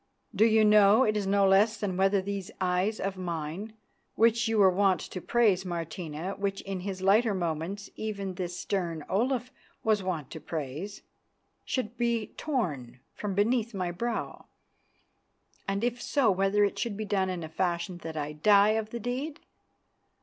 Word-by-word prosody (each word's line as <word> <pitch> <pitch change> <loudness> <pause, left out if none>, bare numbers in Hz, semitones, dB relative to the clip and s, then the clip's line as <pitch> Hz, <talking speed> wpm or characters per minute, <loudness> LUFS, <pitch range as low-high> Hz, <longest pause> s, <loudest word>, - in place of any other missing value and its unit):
Do 220 - +5
you 220 -1 +5
know 210 +3 +6
it 215 -3 +1
is 205 -2 -1
no 200 0 +4
less 205 +3 +4
than 200 -3 -2
whether 195 +1 +2
these 200 0 -4
eyes 185 +4 0
of 195 -1 -3
mine, 175 +4 -4 0.4
which 230 +1 +3
you 225 0 +1
were 195 -2 +6
wont 190 -2 +3
to 185 - -7
praise, 210 -5 +2
Martina, 170 -1 -4
which 195 -1 -2
in 195 -1 -5
his 190 0 -5
lighter 210 +2 +4
moments 175 +3 -3
even 200 -3 -4
this 175 -1 -4
stern 170 -6 -2
Olaf 245 +5 0 0.3
was 215 -2 +2
wont 170 -7 -3
to 160 - -7
praise, 155 +6 -5 0.6
should 245 -2 -3
be 235 -2 -1
torn 145 - -3
from 205 -2 -4
beneath 225 +2 +1
my 180 -2 -2
brow, 230 +6 -4 1.2
and 195 +2 -1
if 240 0 -1
so, 265 -6 +2
whether 195 +2 +2
it 200 - 0
should 225 -4 -2
be 215 - -3
done 195 -2 0
in 180 -2 -4
such 160 - -7
a - - -28
fashion 175 0 -1
that 160 -2 -7
I 150 0 -2
die 200 +7 +5
of 220 0 0
the 235 - -5
deed? 260 +6 -4
195 Hz, 170 wpm, -29 LUFS, 180-220 Hz, 1.2 s, know